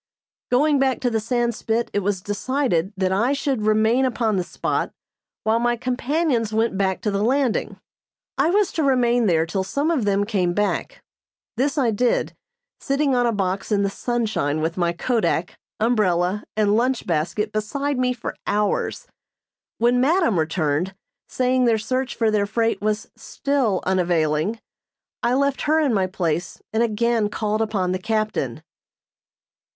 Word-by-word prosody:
Going 285 +3 +3
back 265 -1 +1
to 245 -2 +1
the 225 - +1
Sandspit, 235 0 -1
it 205 - +2
was 200 -1 -1
decided 205 - -1
that 185 -1 +1
I 230 +8 +2
should 275 -4 -1
remain 220 +4 +3
upon 235 -4 0
the 185 - 0
spot, 175 - -2 0.5
while 220 +1 +2
my 240 0 +1
companions 255 -1 0
went 220 -1 +1
back 190 -1 0
to 210 - -1
the 200 0 -1
landing. 255 +1 0 0.6
I - - +2
was 400 +1 +2
to 320 - -1
remain 245 -4 +3
there 165 -3 +3
till 190 +3 -2
some 280 - -1
of 275 -10 0
them 200 0 +2
came 185 -5 0
back. 205 0 -1 0.5
This 275 +5 0
I 250 -5 +2
did, 240 +3 0 0.5
sitting 275 0 0
on 245 -1 +2
a - - +2
box 195 -1 -2
in 200 -1 +2
the 200 - 0
sunshine 220 - -1
with 160 +2 -1
my 175 -2 +1
kodak, 180 -2 -1 0.2
umbrella 205 -4 +1
and 210 -1 +3
lunch 250 +2 +1
basket 170 +6 -1
beside 275 +6 -2
me 250 0 +2
for 245 -2 -5
hours. 210 0 0 0.7
When 240 +2 +3
madam 290 - +3
returned, 160 +2 -1 0.3
saying 255 0 +1
their 230 -2 +3
search 255 +4 -2
for 225 -2 +1
their 205 -1 +1
freight 225 +1 0
was 215 +1 -2
still 265 -9 -1
unavailing, 175 +1 +1 0.6
I 240 +1 +2
left 280 0 +1
her 315 +1 +4
in 290 -6 +2
my 190 -3 +1
place 175 -2 -2
and 220 - +2
again 230 -1 +1
called 215 +1 -1
upon 200 -5 0
the 185 - -1
captain. 215 +1 -2
220 Hz, 160 wpm, -22 LUFS, 195-250 Hz, 0.7 s, her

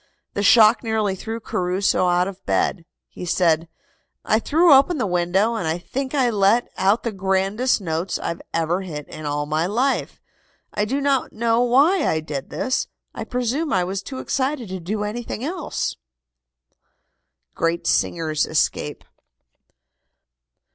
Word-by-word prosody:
The 200 - -2
shock 220 +2 +6
nearly 220 -3 0
threw 225 +4 -5
Caruso 185 -2 0
out 180 +1 +2
of 195 -1 -8
bed. 170 - 0 0.2
He - - -10
said: 165 -2 +2 0.6
"I 220 - +3
threw 325 +6 +4
open 275 +5 +5
the 250 - 0
window, 185 +4 +1
and 185 -8 -2
I 160 +1 0
think 260 +10 -4
I 255 -4 +2
let 210 +3 +2
out 200 +4 +2
the 230 - -2
grandest 195 +6 +1
notes 165 +1 -2
I - - -3 0.2
ever 165 +3 0
hit 150 -6 -7
in 155 -1 -7
all 145 0 -1
my 155 +3 0
life. 250 +7 -1 0.5
I 210 - 0
do 270 +6 -1
not 275 -2 0
know 230 +1 +1
why 285 +8 +4
I 160 - +1
did 150 -3 -6
this. 260 - -1 0.3
I - - -5
presume 255 +5 -1
I 185 - +2
was 190 +2 -3
too 260 +6 -8
excited 260 -4 -2
to 190 0 -5
do 205 +5 -3
anything 225 +2 -4
else." 335 +3 -3 1.6
GREAT 165 +1 -1
SINGERS 155 -3 +1
ESCAPE. 150 -1 -1
200 Hz, 150 wpm, -22 LUFS, 175-245 Hz, 1.6 s, shock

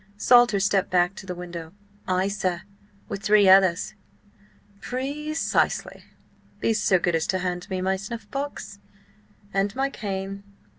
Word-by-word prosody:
Salter 240 -2 +5
stepped 195 0 +1
back 180 +1 +2
to 195 - -11
the 180 - -4
window. 175 -2 -8 0.3
"Ay, 185 +1 +1
sir–with 200 +1 -5
three 205 -1 +5
others." 190 -1 +5 0.9
"Pre 280 +4 -4
cisely. 325 - 0 0.5
Be 225 - +1
so 205 -3 +3
good 175 0 0
as 165 -1 0
to 190 - +1
hand 180 -1 -4
me 185 -1 -2
my 190 +1 0
snuffbox. 235 +2 -6 0.7
And 195 +1 0
my 270 +1 0
cane. 195 -2 -5
195 Hz, 135 wpm, -25 LUFS, 185-215 Hz, 0.9 s, Salter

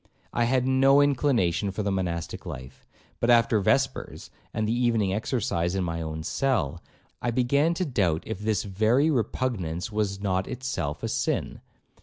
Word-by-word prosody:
I 120 - +2
had 130 +1 +2
no 135 +1 +5
inclination 120 - +2
for 105 +2 -3
the 100 - 0
monastic 85 -3 -3
life; 65 +1 -9 0.3
but 120 - 0
after 115 -2 +5
vespers, 95 - 0 0.2
and 110 0 -1
the 110 - +1
evening 115 -5 +1
exercise 95 -5 -1
in 95 - 0
my 85 -1 -3
own 80 0 -4
cell, 110 - 0 0.4
I 120 - 0
began 140 +7 +2
to 185 - -1
doubt 95 - 0
if 110 -3 -5
this 105 -2 0
very 110 +10 +2
repugnance 110 - -2
was 105 -2 -1
not 95 -2 -1
itself 125 - -4
a - - 0
sin. - - -2
110 Hz, 160 wpm, -26 LUFS, 95-125 Hz, 0.4 s, no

